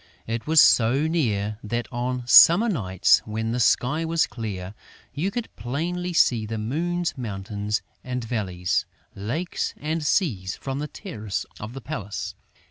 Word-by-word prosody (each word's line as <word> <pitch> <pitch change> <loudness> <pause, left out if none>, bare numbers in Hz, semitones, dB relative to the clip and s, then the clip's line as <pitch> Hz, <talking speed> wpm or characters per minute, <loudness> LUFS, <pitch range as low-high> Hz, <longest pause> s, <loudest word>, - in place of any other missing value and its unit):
It 115 +3 -4
was 160 0 +5
so 125 +5 +5
near 110 -10 0
that, 120 +2 -2
on 125 0 -2
summer 170 - +8
nights, 95 - +3
when 110 +1 -3
the 125 - -1
sky 125 +7 +2
was 165 0 +2
clear, 100 -5 -6 0.4
you 160 +7 -1
could 235 +3 -5
plainly 170 +10 -3
see 120 -9 +3
the 110 +1 -3
moon's 170 +10 -1
mountains 105 -1 -3 0.2
and 125 -1 -3
valleys, 95 -6 -1 0.3
lakes 125 - -3
and 155 +2 -2
seas 110 - 0
from 135 0 -5
the 150 - -3
terrace 110 - -5
of 110 +3 -7
the 135 - -7
palace. 110 -6 -5
120 Hz, 145 wpm, -24 LUFS, 105-160 Hz, 0.4 s, summer